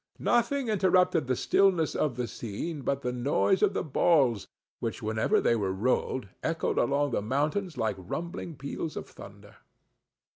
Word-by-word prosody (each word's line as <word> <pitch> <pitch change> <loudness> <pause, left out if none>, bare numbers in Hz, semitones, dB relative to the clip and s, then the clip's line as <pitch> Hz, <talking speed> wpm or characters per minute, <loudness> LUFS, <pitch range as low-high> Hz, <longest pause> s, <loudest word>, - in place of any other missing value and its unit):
Nothing 240 +3 +1
interrupted 185 - +3
the 130 - +1
stillness 180 +1 +2
of 145 -5 0
the 125 0 -2
scene 120 +8 -5
but 140 +1 -2
the 125 - -1
noise 140 +9 +1
of 200 -2 +3
the - - 0
balls, 135 - +2 0.3
which, - - -4
whenever 110 0 +1
they 115 - +2
were 100 -4 -1
rolled, 120 +3 -1
echoed 165 0 -1
along 140 +3 +1
the 115 - 0
mountains 150 - -1
like 110 -3 -1
rumbling 165 - -5
peals 140 +3 -5
of - - -6
thunder. - - -13
140 Hz, 155 wpm, -28 LUFS, 120-175 Hz, 0.3 s, interrupted